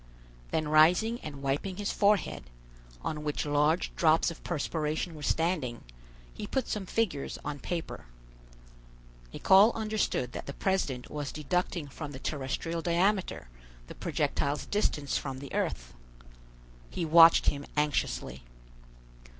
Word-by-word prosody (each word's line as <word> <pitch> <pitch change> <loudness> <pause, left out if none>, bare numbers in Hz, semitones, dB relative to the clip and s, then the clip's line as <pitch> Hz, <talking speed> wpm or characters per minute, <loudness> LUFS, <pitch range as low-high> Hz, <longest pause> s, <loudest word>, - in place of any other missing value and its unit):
Then 155 -1 -1
rising 175 +10 +4
and 140 -2 -8
wiping 145 +8 -2
his 205 -1 -2
forehead, 200 - +1 0.5
on 150 -1 -3
which 150 0 -2
large 150 +3 +1
drops 160 0 +3
of 165 - -12
perspiration 160 +1 -2
were 155 - -10
standing, 155 -6 -1 0.5
he - - -6
put 265 -3 -1
some 200 -3 -3
figures 185 -12 -1
on 145 -1 -4
paper. 170 - -5 1.3
Nicholl 195 - +6
understood 215 - -1
that - - -7
the 140 - -5
president 165 -10 -1
was 145 -2 -4
deducting 165 +1 -2
from 145 +1 -7
the 130 - -7
terrestrial 155 +4 -3
diameter 175 - 0 0.4
the - - -10
projectile's 140 +1 -1
distance 150 -9 0
from 135 -2 -5
the 140 +1 -9
earth. - - -2 1.0
He 170 - -3
watched 165 +1 +7
him 140 -1 0
anxiously. 145 - -1
155 Hz, 125 wpm, -29 LUFS, 140-180 Hz, 1.3 s, watched